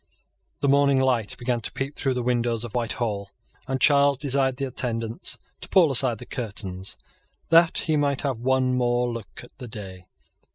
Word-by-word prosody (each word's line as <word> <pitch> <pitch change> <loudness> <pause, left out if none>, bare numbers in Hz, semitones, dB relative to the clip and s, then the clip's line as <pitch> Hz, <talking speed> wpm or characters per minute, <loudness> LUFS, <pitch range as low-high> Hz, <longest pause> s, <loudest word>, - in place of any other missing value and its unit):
The 140 - +1
morning 140 -1 +4
light 125 -5 +1
began 120 -1 -1
to - - -4
peep 135 +2 -4
through 135 -2 -1
the 125 - -2
windows 120 -2 0
of 120 - -7
Whitehall; 110 -4 -2 0.4
and 130 0 -1
Charles 140 -1 +5
desired 135 -2 0
the 140 - -1
attendants 115 -3 -2 0.2
to - - -9
pull 170 -6 +5
aside 125 -3 +3
the - - -10
curtains, 95 -5 -4 0.5
that 165 0 +5
he 155 - +1
might 140 -2 +1
have 135 -6 -2
one 130 +1 +1
more 125 -1 +1
look 105 -9 -8
at 120 - -16
the 125 - -7
day. 95 -4 -9
125 Hz, 175 wpm, -25 LUFS, 115-135 Hz, 0.5 s, Charles